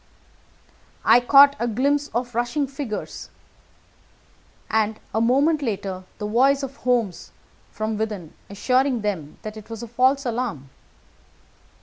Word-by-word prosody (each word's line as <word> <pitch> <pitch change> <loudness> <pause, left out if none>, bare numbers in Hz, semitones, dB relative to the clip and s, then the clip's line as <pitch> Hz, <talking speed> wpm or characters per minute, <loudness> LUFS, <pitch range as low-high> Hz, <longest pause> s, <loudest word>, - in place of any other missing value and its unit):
I - - +7
caught 280 +3 +7
a 235 - 0
glimpse 280 +6 +1
of 245 -1 -3
rushing 240 +5 0
figures, 270 -5 -6 1.4
and 220 0 0
a 220 - +1
moment 280 +6 +3
later 195 -6 -4
the 210 - -5
voice 270 +6 +3
of 275 +1 -6
Holmes 235 -7 -1 0.4
from 215 0 -3
within 210 -7 -4 0.2
assuring 250 +4 +1
them 185 -8 -4
that 215 0 -7
it 215 0 -12
was 225 +1 -7
a - - -6
false 260 +4 +2
alarm. 225 - -3
235 Hz, 125 wpm, -23 LUFS, 215-270 Hz, 1.4 s, I